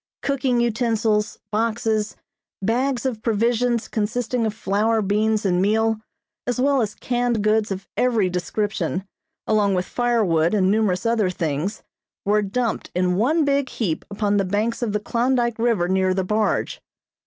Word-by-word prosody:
Cooking 265 -3 +1
utensils, 225 -2 +1
boxes, 220 -1 0 0.4
bags 245 +5 0
of 235 -5 -2
provisions 235 +1 +1
consisting 230 +2 -1
of 215 - -2
flour, 220 +2 +1
beans 210 +2 +1
and 180 -2 +2
meal, 220 +2 +2 0.5
as 245 0 -1
well 275 0 +3
as 210 -2 -2
canned 245 -3 -1
goods 215 0 +2
of 195 0 -5
every 230 -6 +2
description, 180 0 -2 0.4
along 205 -3 +2
with 180 0 0
firewood 210 -9 +1
and 190 -2 +3
numerous 210 -2 +1
other 230 -4 +2
things, 165 +2 -3 0.4
were 210 +1 +3
dumped 225 +3 -2
in 180 0 +1
one 295 - +2
big 280 -2 +1
heap 180 -9 -2
upon 205 0 0
the 200 - +2
banks 210 +6 -1
of 235 -3 0
the 210 - 0
Klondyke 235 +1 0
River 225 -7 +2
near 185 0 +1
the 190 - 0
barge. 210 +3 0
215 Hz, 150 wpm, -22 LUFS, 200-235 Hz, 0.5 s, well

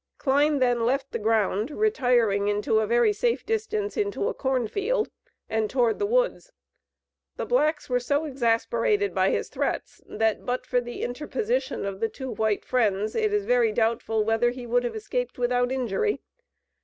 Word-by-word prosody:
Kline 290 +2 +2
then 245 -3 +2
left 270 +3 0
the - - -3
ground, 215 +1 +1
retiring 245 - +2
into 205 +1 +1
a 215 - 0
very 240 - +3
safe 470 +2 0
distance 435 -2 -2
into 410 +1 -1
a - - -3
cornfield, 390 - -1 0.4
and 220 -1 -1
toward 245 -3 +1
the 405 - +1
woods. - - 0 0.8
The - - -4
blacks 310 -11 +1
were 250 -1 +1
so 285 +5 0
exasperated 255 - +1
by - - +2
his - - -1
threats, - - -3
that, 220 0 0
but 250 +1 -2
for 245 - +1
the 240 0 -6
interposition 255 -1 -2
of 195 -1 -4
the 225 0 0
two 260 +3 -6
white 220 -1 -1
Friends, 215 -4 +1
it 440 -2 +1
is 415 -1 0
very 480 -1 +3
doubtful 225 - 0
whether 225 +2 +2
he 245 0 -7
would 245 +1 +1
have 240 - -3
escaped - - -3
without 245 0 +1
injury. 260 - 0
250 Hz, 170 wpm, -26 LUFS, -, 0.8 s, very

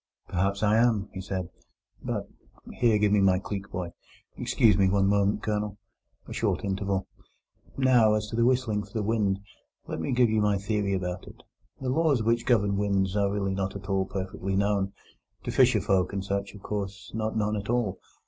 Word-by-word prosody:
"Perhaps 100 +3 0
I 105 +1 +4
am," 115 -4 +2
he 95 - -5
said; 95 -2 -4 0.5
"but—Here, 115 -3 -2
give 105 -1 +2
me 105 -1 +4
my 95 -1 +4
cleek, 100 0 -5
boy!—Excuse 90 +4 -1
me 95 0 +3
one 100 0 +3
moment, 100 +1 +2
Colonel." 105 -1 -2 0.5
A - - -7
short - - -1
interval. 95 -1 -1 0.7
"Now, 125 -5 +5
as 105 0 -1
to 115 - 0
whistling 125 -4 +2
for - - -13
the 110 -2 -1
wind, 100 -3 +1 0.4
let - - -5
me - - -2
give 120 -2 +3
you 110 -1 +2
my 105 -1 +2
theory 100 0 -1
about 90 -1 -4
it. - - -14 0.4
The 130 - -2
laws 140 -4 +2
which 115 +2 +1
govern 100 -5 +3
winds 100 -1 +1
are 100 -1 +2
really 100 -1 -1
not 95 0 -2
at 100 0 -8
all 95 -1 +1
perfectly 95 0 -3
known—to 100 -1 -3
fisherfolk 95 0 +3
and 95 -1 -3
such, 100 +1 -3
of 100 - -13
course, 100 -2 -5
not 110 0 -2
known 105 0 0
at 100 0 -5
all. 120 -6 0
100 Hz, 175 wpm, -27 LUFS, 95-110 Hz, 0.7 s, Now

